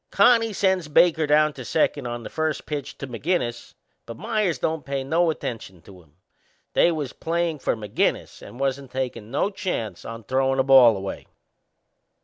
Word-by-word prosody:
Connie 230 -2 +4
sends 190 -4 +1
Baker 160 +1 +3
down 150 +1 +4
to 130 - -8
second 145 -1 0
on 120 0 -5
the - - -7
first 155 -1 -2
pitch 145 -2 -5
to 140 - -6
McInnes, 120 -2 -3 0.3
but 115 - -8
Meyers 215 -4 -1
don't 160 -2 -2
pay 140 -1 -3
no 165 +5 +2
attention 115 - -5
to 95 -1 -15
him 75 -3 -27 0.6
they 175 - +4
was 150 -5 -4
playin' 170 -2 -2
for - - 0
McInnes 105 -2 -2
and 120 - -12
wasn't 135 0 -2
takin' 125 -5 -4
no 145 - 0
chances 115 - -4
o' 115 0 -8
throwin' 135 0 +1
the 130 - +3
ball 130 -5 +7
away. 95 0 -6
140 Hz, 170 wpm, -24 LUFS, 120-165 Hz, 0.6 s, ball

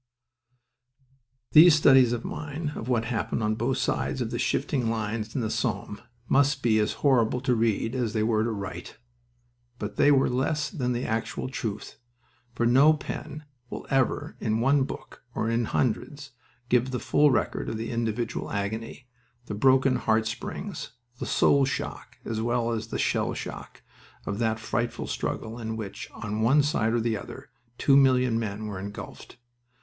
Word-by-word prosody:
These 160 +1 +9
studies 135 -5 +6
of 120 -1 -3
mine, 150 0 -4
of 115 - -6
what 120 -2 +1
happened 115 -1 -2
on 105 0 +1
both 110 - -1
sides - - -1
of - - -2
the - - -3
shifting 125 -5 0
lines 110 0 -3
in 130 - 0
the 110 - -1
Somme, 110 -3 -2 0.3
must 140 0 +2
be 110 -2 +3
as 105 - +1
horrible 125 -3 +3
to 130 -2 +1
read 115 0 0
as 120 -5 -1
they 110 - +1
were 110 -1 +2
to 115 - 0
write. 100 -5 -6 0.8
But 105 -3 -6
they - - +5
are 135 -2 +4
less 140 +4 -1
than 125 -9 -1
the 120 +1 -2
actual 115 +3 -2
truth, 110 -6 -5 0.6
for 120 - 0
no 135 +6 +6
pen 150 +1 -6 0.3
will - - -7
ever 135 -2 0
in 110 -1 0
one 135 +3 +3
book, - - -9
or 110 - 0
in 115 0 +1
hundreds, 140 +5 -2 0.4
give 125 +1 +2
the 125 -1 -2
full 150 0 +3
record 130 - 0
of 110 - -3
the 115 +1 -4
individual 115 0 -2
agony, 110 +5 -4 0.4
the 105 - -5
broken 130 +4 +4
heart 110 0 +1
springs, 185 - -5 0.3
the - - -4
soul 140 -1 +4
shock 130 0 -4
as 110 -1 -2
well 120 0 0
as 110 -1 -3
the - - -4
shell - - 0
shock, - - -8 0.4
of 100 - -3
that 110 -1 0
frightful 115 +2 -2
struggle 110 +2 -4
in 110 -1 -4
which, 105 -3 -7
on 105 +1 -4
one 135 +6 +4
side 115 -6 +1
and 120 -1 +1
the 115 -1 0
other, - - -10 0.3
two 140 - +4
million 130 -4 +4
men 105 -1 -4
were 100 -3 -5
engulfed. 100 +4 -9
115 Hz, 170 wpm, -27 LUFS, 110-135 Hz, 0.8 s, These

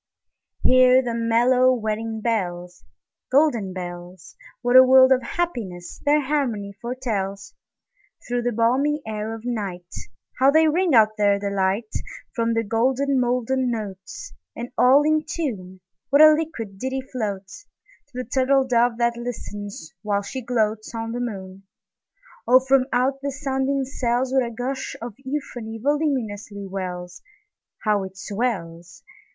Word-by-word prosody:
Hear 255 0 +6
the 240 -2 -3
mellow 240 +3 +3
wedding 220 0 -3
bells, 180 -6 -3 0.5
Golden 255 -9 +2
bells! 175 -1 -8 0.3
What 245 +1 +2
a 255 - +12
world 260 0 +6
of 260 -1 +4
happiness 235 - -4
their 295 +1 +3
harmony 255 -8 -2
foretells! 220 -6 -4 0.7
Through 245 0 -1
the 245 0 -1
balmy 265 +6 +1
air 215 0 -4
of 225 - -11
nightHow 210 +4 -2
they 315 0 +5
ring 335 -1 +2
out 215 -1 +4
their 205 -1 +3
delight! 200 +2 -1 0.4
From 230 -1 0
the 225 - +1
molten 260 +4 +1
golden 250 +1 0
notes, 200 -5 -6 0.2
And 240 +1 -6
all 265 +4 +5
in 310 0 +2
tune, 210 - -5 0.3
What 285 +2 +6
a 310 0 +9
liquid 235 -11 -4
ditty 265 +2 -2
floatsTo 205 - -4 0.5
the 255 - -3
turtle 265 +2 +2
dove 240 -2 +2
that 235 0 +1
listens, 205 -7 -7
while 205 -1 -1
she 260 +6 -6
gloatsOn 225 -1 -2
the 245 - -3
moon! 195 -5 -6 0.9
Oh, 250 +2 +7
from 265 0 +2
out 265 +2 +1
the 280 - -2
sounding 270 -1 -1
cells, 255 0 -1
What 265 -1 +3
a - - -5
gush 250 +3 -4
of 235 -1 -6
euphony 260 -5 -5
voluminously 225 -7 -2
wells! 180 -2 -6 0.6
How 210 -2 +2
it 190 0 -9
swells! 185 -5 -4
235 Hz, 135 wpm, -23 LUFS, 205-260 Hz, 0.9 s, a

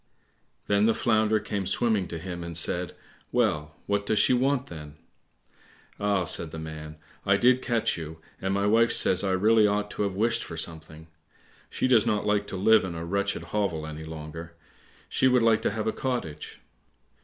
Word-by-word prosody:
Then 100 +1 +3
the 115 - +2
Flounder 110 -2 +2
came 100 -2 -3
swimming 105 -1 +1
to 85 - -6
him 85 0 -6
and 85 -1 -4
said, 90 +1 0 0.4
"Well 75 0 0
what 100 0 -1
does 110 - +1
she - - +4
want, 130 +1 +1
then?" 75 -3 -10 1.0
"Ah," 100 -2 +1
said 85 -1 +1
the 80 - -8
man, 80 -1 -7 0.3
"I - - +3
did 125 +1 +4
catch 115 -8 0
you, 80 0 -8 0.2
and 95 - -1
my 100 +1 0
wife 115 +3 +4
says 95 +1 +2
I 100 - 0
really 105 +3 +4
ought 105 0 -1
to - - -5
have 100 -2 -1
wished 115 +3 +1
for 85 - -8
something. 80 -1 -4 0.6
She - - -1
does 120 -5 +4
not 105 -1 0
like 105 -1 +1
to 95 - -5
live 110 +3 +5
in 90 -3 -5
a 85 0 -5
wretched 100 +3 -1
hovel 95 -7 -1
any 80 0 -7
longer. 80 +1 -8 0.5
She 130 - +2
would 125 -2 +3
like 115 -1 +4
to - - +1
have 110 +1 -3
a 110 - +1
cottage." 120 - -4
100 Hz, 190 wpm, -27 LUFS, 80-110 Hz, 1.0 s, live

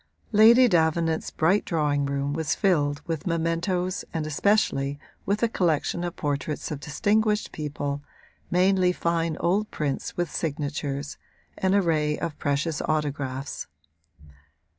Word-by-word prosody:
Lady 230 +4 +7
Davenant's 165 -3 +1
bright 180 +6 +2
drawing 145 -4 0
room 140 0 -1
was 160 -1 -1
filled 145 -8 +1
with 165 0 -3
mementoes 170 +2 -1
and 160 -2 -2
especially 145 -4 +1 0.3
with 205 +3 0
a - - +5
collection 175 -4 0
of 175 -1 -3
portraits 145 +1 -3
of 150 - -4
distinguished 210 +8 +1
people, 145 -1 -4 0.5
mainly 185 0 +3
fine 170 -2 -1
old 200 +5 +1
prints 145 -3 -3
with 175 -3 -1
signatures, 145 -2 -3 0.4
an 190 +1 +2
array 155 -6 +2
of 165 -3 -4
precious 150 +2 -1
autographs. 140 -3 -2
160 Hz, 120 wpm, -26 LUFS, 145-180 Hz, 0.5 s, Lady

